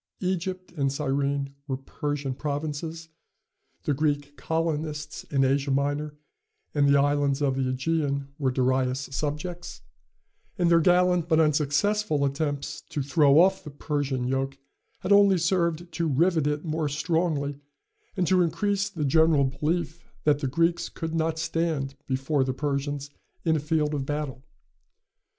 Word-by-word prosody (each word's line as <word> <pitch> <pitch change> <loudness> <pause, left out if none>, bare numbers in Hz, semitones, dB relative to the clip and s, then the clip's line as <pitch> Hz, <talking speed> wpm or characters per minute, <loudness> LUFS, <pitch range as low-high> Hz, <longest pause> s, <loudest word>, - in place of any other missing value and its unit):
Egypt 185 0 -2
and 140 -5 0
Cyrene 140 0 -1
were 130 -2 -2
Persian 145 0 -3
provinces; 155 +3 -4 0.7
the 145 - +1
Greek 145 0 -1
colonists 155 -2 -3
in 135 -2 +1
Asia 140 +1 +1
Minor 145 +2 0 0.6
and 145 -1 +3
the 140 0 +5
islands 145 -1 +2
of 140 -2 +1
the 135 - -1
Ægean 140 0 -1
were 135 -3 +1
Darius' 130 +1 0
subjects; 150 +5 -4 0.7
and 175 -2 +2
their 170 - +6
gallant 180 0 +3
but 160 -1 +4
unsuccessful 155 +2 +2
attempts 140 0 -2
to 145 - -2
throw 145 +1 +5
off 190 +2 +4
the - - -7
Persian 140 -3 -2
yoke 135 +1 -1 0.4
had 185 - -2
only 200 -2 +6
served 170 -1 0
to 165 0 -1
rivet 160 +1 +2
it 150 +2 -2
more 155 -1 -1
strongly, 150 -2 -1 0.6
and 180 - +2
to 180 +2 +4
increase 195 +4 0
the 160 -7 -3
general 160 0 +4
belief 160 +4 -2 0.2
that 145 -1 +3
the 140 - -1
Greeks 165 +5 +1
could 160 0 -5
not 160 0 0
stand 160 -4 -1
before 135 +1 +1
the 130 0 -2
Persians 145 0 -2 0.3
in 160 -1 +3
a - - +1
field 150 0 0
of 140 -2 -2
battle. 145 -4 -3
150 Hz, 145 wpm, -26 LUFS, 140-165 Hz, 0.7 s, their